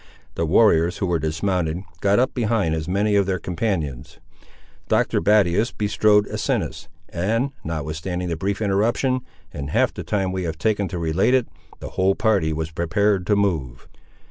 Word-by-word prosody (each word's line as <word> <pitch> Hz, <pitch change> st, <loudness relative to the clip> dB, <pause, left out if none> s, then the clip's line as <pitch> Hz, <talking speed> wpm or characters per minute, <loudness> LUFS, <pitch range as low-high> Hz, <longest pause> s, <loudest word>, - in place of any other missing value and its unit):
The 85 Hz, -, -1 dB
warriors 85 Hz, -2 st, +4 dB
who 100 Hz, -, -1 dB
were 85 Hz, -2 st, 0 dB
dismounted, 85 Hz, +2 st, -1 dB, 0.2 s
got 100 Hz, +2 st, +2 dB
up 130 Hz, +2 st, +2 dB
behind 110 Hz, -8 st, 0 dB
as 80 Hz, -1 st, -3 dB
many 100 Hz, +3 st, +1 dB
of 100 Hz, -2 st, +3 dB
their 95 Hz, -1 st, 0 dB
companions. 85 Hz, -, -3 dB, 0.7 s
Doctor -, -, +1 dB
Battius 105 Hz, +1 st, +3 dB
bestrode 105 Hz, 0 st, +2 dB
Asinus; -, -, -2 dB, 0.2 s
and, 115 Hz, +10 st, -1 dB
notwithstanding 80 Hz, +3 st, -4 dB
the 85 Hz, -, -2 dB
brief 100 Hz, +5 st, -2 dB
interruption, 115 Hz, +6 st, +1 dB, 0.3 s
in 70 Hz, -3 st, -5 dB
half 75 Hz, -, +1 dB
the -, -, -6 dB
time 95 Hz, -3 st, -1 dB
we 95 Hz, 0 st, -3 dB
have 80 Hz, -3 st, -3 dB
taken 105 Hz, +1 st, 0 dB
to 90 Hz, -, -5 dB
relate 85 Hz, +9 st, +2 dB
it, 130 Hz, -3 st, +1 dB, 0.3 s
the -, -, -6 dB
whole 95 Hz, +1 st, +1 dB
party 100 Hz, -8 st, +1 dB
was 80 Hz, 0 st, -3 dB
prepared 90 Hz, +4 st, 0 dB
to 105 Hz, -, +3 dB
move. 80 Hz, -12 st, -1 dB
95 Hz, 165 wpm, -22 LUFS, 80-105 Hz, 0.7 s, warriors